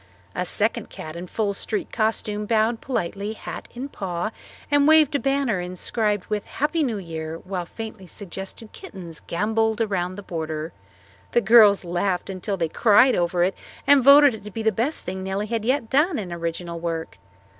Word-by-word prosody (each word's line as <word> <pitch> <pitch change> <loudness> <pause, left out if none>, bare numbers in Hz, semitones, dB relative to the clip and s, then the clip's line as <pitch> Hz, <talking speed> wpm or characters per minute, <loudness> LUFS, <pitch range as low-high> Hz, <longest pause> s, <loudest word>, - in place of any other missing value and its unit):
A 180 - -2
second 220 +4 -1
cat 155 +1 -8
in 175 +1 -6
full 205 +1 -1
street 375 - -3
costume 215 -1 -1
bowed 225 +1 +2
politely, 200 -3 -3
hat - - -8
in 255 +3 -4
paw, 190 -5 -3 0.4
and 290 0 +4
waved 315 -2 +6
a 285 - +2
banner 270 -8 0
inscribed 205 +3 -1
with 210 -1 -2
"Happy 300 +4 -1
New 240 -7 0
Year," 160 -3 -5
while 185 -1 -5
faintly 220 -4 -8
suggested 195 +3 -7
kittens 170 -5 -10
gambolled 220 +4 0
around 185 -5 -1
the 205 - -8
border. 160 -3 -4 0.6
The 240 - +4
girls 210 -3 +6
laughed 180 +2 -1
until 195 +1 -3
they 165 -2 0
cried 220 +9 +5
over 175 0 +1
it 185 +2 +1 0.3
and 280 -2 +6
voted 280 0 +8
it 220 - -9
to 210 - -7
be 220 +2 -5
the 220 - +3
best 240 +9 -2
thing 190 +1 -4
Nellie 190 +2 -2
had 225 0 -2
yet 255 +1 +1
done 300 +5 +3
in 185 -5 -4
original 170 0 -4
work. 165 -1 -4
205 Hz, 175 wpm, -24 LUFS, 180-230 Hz, 0.6 s, voted